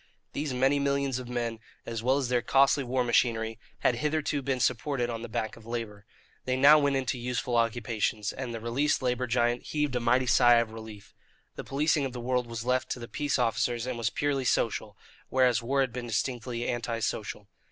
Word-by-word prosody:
These 145 -1 -2
many 135 +3 +2
millions 140 -2 0
of 125 -1 -8
men, 120 -2 -2 0.3
as 115 -1 -4
well 130 +4 +2
as 135 -3 -1
their 125 -1 +1
costly 135 +3 +3
war 125 0 0
machinery, 115 -2 +1 0.2
had 120 - +2
hitherto 150 +1 -1
been 135 -1 -1
supported 125 0 0
on 115 -1 -5
the 120 - -7
back 110 0 -3
of 115 - -15
labour. 110 -3 -6 0.4
They 130 0 0
now 145 +3 +8
went 140 -1 +1
into 130 -1 -1
useful 120 0 -2
occupations, 115 -2 0
and 130 -2 -5
the 115 - -5
released 130 +6 0
labour 125 0 0
giant 120 0 +1
heaved 150 -3 -2
a - - +1
mighty 125 +2 +2
sigh 120 -1 +6
of 115 -1 +1
relief. 110 -2 -10 0.4
The - - -6
policing 145 +2 +1
of 135 -2 -3
the 125 - -6
world 125 0 -1
was 115 0 -6
left 130 +1 0
to - - -9
the 120 - -7
peace 145 +3 -1
officers 120 -1 0
and 130 -1 -3
was 115 -2 -1
purely 140 -2 -1
social, 110 -4 0 0.3
whereas 125 -3 +3
war 135 +4 +1
had 130 -3 -1
been 125 -1 -5
distinctly 120 +1 -2
anti 120 -1 -2
social. 105 -2 -3
125 Hz, 205 wpm, -28 LUFS, 115-130 Hz, 0.4 s, now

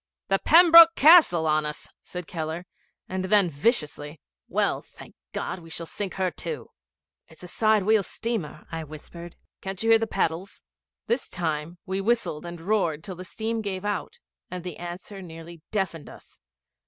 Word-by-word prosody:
'The 195 0 +3
Pembroke 335 0 +8
Castle 300 - +7
on 155 0 +2
us!' 150 0 -5
said 180 -1 -7
Keller; 160 +1 -5 0.4
and 185 0 -3
then, 195 -3 +4
viciously, 150 - -1 0.3
'Well, - - 0
thank - - -15 0.2
God, - - -4
we 165 -1 -14
shall 165 +1 -5
sink 195 +3 -5
her 185 -2 0
too.' 465 - -6 0.6
'It's 160 +2 -15
a - - -8
side 215 +2 +2
wheel 215 +1 +4
steamer,' 200 -7 -4
I 165 -1 -4
whispered. 160 +3 -11 0.3
'Can't 195 +1 -5
you 225 - +3
hear 225 - +7
the 225 - -1
paddles?' 170 0 -2 0.5
This 240 +3 -1
time 160 0 -3
we 190 0 -2
whistled 195 -7 -1
and 170 0 -7
roared 170 -5 0
till 190 -1 -6
the 180 - -8
steam 225 +4 -3
gave 200 -2 -4
out, 210 - -3 0.3
and 180 -1 -6
the 180 -3 -6
answer 175 +3 -8
nearly 165 -1 -11
deafened 190 -7 -3
us. - - -16
185 Hz, 165 wpm, -26 LUFS, 165-215 Hz, 0.6 s, Pembroke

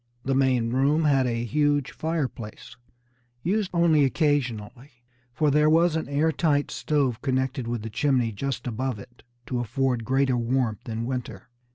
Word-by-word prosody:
The 135 - +1
main 130 -3 +2
room 140 +5 +2
had 135 -3 +3
a 115 -1 -1
huge 145 +1 +1
fireplace, 135 -9 -4 0.7
used 195 +2 0
only 170 -4 +4
occasionally, 130 -3 -1 0.3
for 150 +4 +1
there 150 +2 +4
was 165 +1 +4
an 160 -3 -3
air 150 +3 +2
tight 150 -3 +1
stove 135 -6 0
connected 130 -2 -1
with 120 -2 -3
the 110 - -5
chimney 125 -1 +1
just 130 +4 -4
above 125 0 -2
it, 120 +4 -14 0.2
to 125 - -2
afford 120 +1 -1
greater 130 +1 +1
warmth 120 -3 -1
in 115 +1 -3
winter. 120 -6 -5
130 Hz, 155 wpm, -25 LUFS, 120-145 Hz, 0.7 s, only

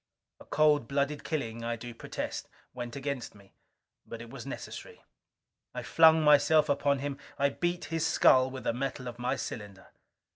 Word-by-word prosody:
A - - -14
cold 150 -5 +3
blooded 140 +2 -1
killing, 115 -7 -3
I 115 0 -1
do 120 +1 -8
protest, - - -5 0.2
went 120 -1 -6
against 140 -4 -4
me. 100 -1 -19 0.5
But 115 - -9
it 115 0 -10
was - - -8
necessary. - - -8 0.7
I - - -4
flung 160 -1 +6
myself 150 +1 +5
upon 140 0 +2
him. 140 0 -4 0.2
I 140 0 +3
beat 175 +3 -2
his 165 -1 0
skull 130 -4 +5
with 130 0 -7
the - - 0
metal 130 0 -4
of 120 0 -7
my 125 +2 0
cylinder. 105 -7 -7
135 Hz, 170 wpm, -30 LUFS, 120-145 Hz, 0.7 s, flung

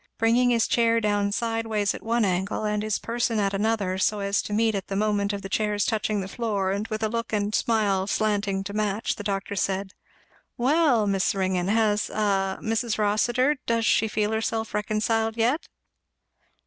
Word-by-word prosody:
Bringing 235 +2 +3
his 230 -2 +2
chair 230 -1 +3
down 205 -2 0
sideways 225 -1 -1
at - - -8
one 230 0 +1
angle 190 +3 -1
and 210 0 0
his 215 -1 -1
person 230 -1 -1
at 200 -1 0
another, 200 -2 0
so 210 +2 +1
as 200 0 0
to - - -8
meet 220 +1 +2
at 195 -2 -3
the 195 - -4
moment 205 0 +1
of 200 -1 -5
the - - -4
chair's 210 +1 0
touching 215 -2 0
the 190 - -5
floor, 200 -3 -1
and 200 +3 -2
with 215 0 -4
a - - +3
look 230 +1 -3
and 210 -1 -1
smile 205 -5 +1
slanting 205 -2 0
to 200 +1 -6
match, 210 0 -1
the 205 - -6
doctor 200 -1 -3
said, 195 0 -2 0.6
"Well, 265 -3 +3
Miss 195 -1 +1
Ringgan, 185 -2 0
has 215 0 +1
a 195 -2 0
Mrs. 225 0 -1
Rossitur, 240 +7 +2
does 230 -1 +1
she 225 - +3
feel 210 0 -1
herself 220 0 -2
reconciled 220 +2 0
yet?" 245 +8 +1
210 Hz, 185 wpm, -25 LUFS, 200-225 Hz, 0.6 s, Bringing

